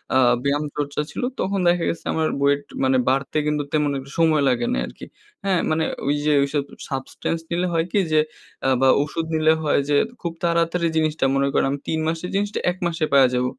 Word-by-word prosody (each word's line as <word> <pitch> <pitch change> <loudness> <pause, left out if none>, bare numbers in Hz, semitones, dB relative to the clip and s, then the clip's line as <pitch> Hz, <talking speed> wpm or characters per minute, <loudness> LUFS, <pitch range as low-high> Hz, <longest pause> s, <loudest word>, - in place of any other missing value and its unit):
আ - - +6 0.3
ব্যায়ামচর্চা 145 0 -1
ছিল, - - -5 0.2
তখন 195 +1 0
দেখা 175 0 +3
গেছে 170 - -5
আমার 160 -1 +1
ওয়েট 140 0 +3 0.2
মানে 130 0 +3
বাড়তে 135 +3 0
কিন্তু 150 -1 0
তেমন 150 -1 +2
একটা 135 +1 -9
সময় 160 -2 +4
লাগে 120 -1 +1
নাই 60 - 0
আর - - -10
কি। - - -7 0.4
হ্যাঁ? 190 -3 +2
মানে 160 +1 +1 0.2
ঐ - - -2 0.2
যে 150 - +3
ঐসব 140 +1 -1 0.3
সাবস্টেন্স 135 +4 -3
নিলে 175 +2 0
হয় 165 0 +1
কি? 205 - +2
যে, 155 - +4 0.5
আ - - +3
বা 135 - +5 0.2
ওষুধ 160 +2 -4
নিলে 155 0 +4
হয় 150 - +2
যে, 145 - +3 0.3
খুব 170 -2 -3
তাড়াতাড়ি 170 0 +1
জিনিসটা; 155 -2 +1
মনে 140 0 +2
করেন - - +2
আমি 140 - -3
৩ 160 - 0
মাসের 165 +2 -2
জিনিসটা, 205 +1 -1
১ 180 - -9
মাসে 165 -2 -3
পাইয়া 135 -2 +6
যাব। 125 0 +1
155 Hz, 210 wpm, -22 LUFS, 140-165 Hz, 0.5 s, আ